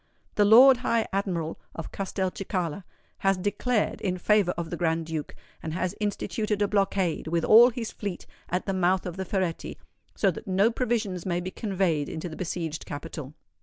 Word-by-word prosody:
The 205 - +3
Lord 250 +5 +8
High 230 -2 0
Admiral 175 -5 -2 0.2
of 165 - -6
Castelcicala 185 -2 -3 0.3
has 195 -1 +2
declared 205 +4 0
in 185 -2 -1
favour 205 0 +3
of 170 -1 -4
the - - -1
Grand 165 -1 0
Duke, 160 -2 -5 0.3
and 160 - -4
has 185 0 -1
instituted 210 0 -2
a - - +2
blockade, 195 -5 0
with 165 0 0
all 235 +3 +8
his 235 -2 -5
fleet, 200 -4 -5 0.2
at 180 +1 -1
the 195 - -1
mouth 185 0 +2
of 180 -2 -4
the 190 0 -4
Ferretti, 185 -3 -2 0.4
so 195 - +3
that 170 - -9
no 195 +4 +3
provisions 220 -7 -1
may 175 -2 -1
be 180 +1 -5
conveyed 185 -9 -1
into 160 +2 -5
the 155 - -8
besieged 165 -3 -4
capital. 145 -1 -7
185 Hz, 175 wpm, -27 LUFS, 170-205 Hz, 0.4 s, Lord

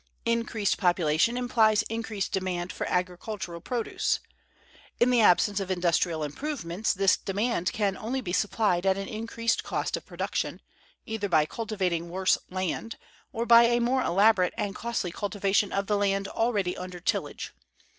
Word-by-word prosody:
Increased 230 -3 0
population 175 +5 +2
implies 225 -4 +3
increased 220 -3 -3
demand 185 -2 -2
for - - -4
agricultural 180 0 -3
produce. 240 +3 -1 0.8
In 240 +1 +4
the 245 -2 +4
absence 205 +1 +4
of 195 -1 -4
industrial 175 -3 +1
improvements, 205 - -2
this 195 0 +3
demand 200 -2 -1
can 205 -5 0
only 245 +7 -3
be 180 -9 -4
supplied 200 -3 +1
at 190 0 +3
an 195 0 -4
increased 230 +1 -2
cost - - -2
of - - -6
production, - - -3 0.5
either 220 -2 -3
by 155 -3 +4
cultivating 185 -5 -2
worse 185 +2 +2
land, 185 +5 -3 0.3
or 230 +1 -2
by 235 0 +8
a 240 0 +3
more 250 +2 +1
elaborate 195 -2 +3
and 200 -1 -2
costly 225 -5 -3
cultivation 200 +1 0
of 200 0 -1
the 210 +1 +1
land 195 -1 0
already 205 -6 0
under 180 -1 -7
tillage. 175 - -3
200 Hz, 150 wpm, -27 LUFS, 180-225 Hz, 0.8 s, by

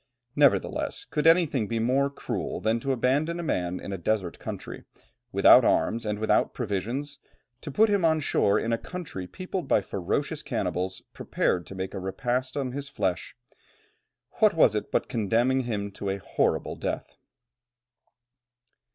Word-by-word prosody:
Nevertheless, 145 -2 +2
could 150 +1 0
anything 165 - +4
be 115 - -2
more 130 +5 +2
cruel 140 - -4
than 110 +1 +1
to 135 +4 -2
abandon 140 +7 +1
a - - -3
man 90 - -1
in 100 - -6
a 95 - -4
desert 95 -2 -1
country, - - -7 0.5
without - - +7
arms 115 -1 +1
and 105 0 -1
without 110 +1 +1
provisions, 120 +6 -3 0.4
to - - -7
put 215 +10 +4
him 200 -3 +1
on 160 -1 +3
shore 100 -8 +2
in 115 - -1
a 115 - 0
country 160 - -7
peopled 185 - -5
by - - +4
ferocious 90 -3 -2
cannibals, 95 +1 -3
prepared 90 -1 -1
to 95 - -9
make 95 0 -4
a - - -4
repast 125 +7 -2
on 135 -3 -2
his 140 +2 -5
flesh; 95 -10 -2 1.0
what - - +5
was - - +5
it - - -3
but - - 0
condemning 120 +5 +1
him 100 -4 -3
to 100 0 -5
a 95 - -1
horrible 100 - -1
death? - - -4
120 Hz, 160 wpm, -27 LUFS, 100-140 Hz, 1.0 s, without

